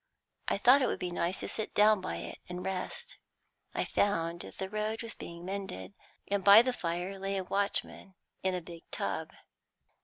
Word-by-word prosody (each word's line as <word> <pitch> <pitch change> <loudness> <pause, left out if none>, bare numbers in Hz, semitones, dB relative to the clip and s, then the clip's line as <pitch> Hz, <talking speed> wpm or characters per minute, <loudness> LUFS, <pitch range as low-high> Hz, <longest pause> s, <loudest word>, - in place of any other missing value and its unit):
I - - +2
thought 250 +7 +6
it 255 - +3
would - - -1
be 180 - -3
nice 175 +1 -1
to - - -3
sit 220 - -4
down 210 -1 +6
by 185 - -3
it - - -6
and 180 0 -5
rest. 190 - -4 0.6
I - - +1
found 170 -4 +1
that - - -9
the 190 - -3
road 215 +3 -2
was 230 - -4
being 170 0 -8
mended, 185 - -5 0.3
and 200 -1 0
by 200 +4 +10
the 255 0 0
fire 180 0 -3
lay 195 0 -1
a 190 - -1
watchman 195 0 -1 0.3
in 190 -1 +1
a 180 - -2
big 170 0 -10
tub. - - -2
190 Hz, 190 wpm, -31 LUFS, 175-210 Hz, 0.6 s, by